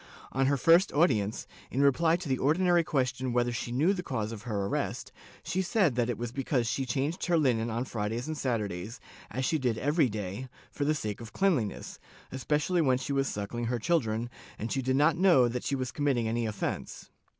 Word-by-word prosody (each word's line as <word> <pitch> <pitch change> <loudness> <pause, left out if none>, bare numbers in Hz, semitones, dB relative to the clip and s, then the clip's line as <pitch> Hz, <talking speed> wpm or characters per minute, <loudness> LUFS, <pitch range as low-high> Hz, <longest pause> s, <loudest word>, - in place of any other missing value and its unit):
On 135 0 +1
her 140 0 +2
first 165 +7 +5
audience, 115 - +1 0.2
in 135 +3 +1
reply 160 +4 +4
to 175 -2 -5
the 130 -2 0
ordinary 175 +4 +3
question 130 -4 -1
whether 120 0 +2
she 120 0 -4
knew 155 +10 +3
the 185 - -3
cause 115 -10 -3
of 110 -3 -7
her 105 -3 -2
arrest, 100 - -3 0.3
she 190 - -1
said 185 - +2
that 120 0 0
it 120 - -2
was 120 0 -4
because 130 -1 0
she 130 +3 -1
changed 140 +7 -1
her 175 -1 +3
Hnen 120 -6 +2
on 120 +3 -2
Fridays 115 0 -3
and 155 +1 -3
Saturdays, 110 -6 -3 0.3
as 130 +1 -2
she 160 - +1
did 125 -4 0
every 145 +1 +2
day, 105 +4 -5 0.2
for 145 - -2
the 155 +1 +2
sake 105 -5 -4
of 110 -2 -10
cleanliness, 150 - 0 0.3
especially 150 +6 0
when 130 -4 +3
she 135 +2 -3
was 135 0 +1
suckling 105 +4 -4
her 120 +1 0
children, 120 -4 0 0.3
and 110 +2 -4
she 135 - 0
did 130 +1 0
not 150 +4 +3
know 170 -9 +5
that 120 +1 -3
she 140 - -1
was 130 -2 -3
committing 135 -6 0
any 115 0 -1
offence. 105 -2 -5
130 Hz, 205 wpm, -29 LUFS, 115-150 Hz, 0.3 s, first